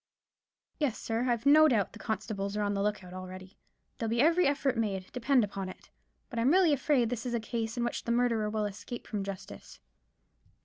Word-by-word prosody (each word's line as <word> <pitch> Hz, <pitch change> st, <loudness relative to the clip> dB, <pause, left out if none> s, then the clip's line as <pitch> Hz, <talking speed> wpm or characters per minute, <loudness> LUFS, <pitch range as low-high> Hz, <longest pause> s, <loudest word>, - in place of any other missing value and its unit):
"Yes, 290 Hz, -7 st, 0 dB
sir; 230 Hz, +3 st, -1 dB
I've 235 Hz, +1 st, 0 dB
no 310 Hz, +2 st, +8 dB
doubt 225 Hz, -9 st, +1 dB
the -, -, -11 dB
constables 210 Hz, -2 st, -3 dB
are 210 Hz, -, 0 dB
on 205 Hz, 0 st, 0 dB
the 200 Hz, -, -1 dB
look 210 Hz, -1 st, -1 dB
out 180 Hz, 0 st, -11 dB
already. 185 Hz, +1 st, -9 dB, 0.4 s
There'll 225 Hz, -, -1 dB
be 230 Hz, +1 st, 0 dB
every 330 Hz, +5 st, +4 dB
effort 280 Hz, -2 st, +1 dB
made, 195 Hz, -5 st, -2 dB
depend 250 Hz, 0 st, +2 dB
upon 195 Hz, -2 st, -4 dB
it; -, -, -13 dB, 0.4 s
but 235 Hz, -, -4 dB
I'm 235 Hz, +3 st, +3 dB
really 350 Hz, -1 st, +5 dB
afraid 265 Hz, -4 st, +2 dB
this 235 Hz, -2 st, -3 dB
is 240 Hz, -, -1 dB
a -, -, +1 dB
case 225 Hz, +1 st, -3 dB
in 240 Hz, -, 0 dB
which 240 Hz, -, -2 dB
the 235 Hz, -, -2 dB
murderer 235 Hz, -3 st, +2 dB
will 215 Hz, 0 st, -1 dB
escape 205 Hz, +4 st, -7 dB
from 205 Hz, -3 st, -3 dB
justice." 195 Hz, -1 st, -8 dB
225 Hz, 210 wpm, -30 LUFS, 205-250 Hz, 0.4 s, no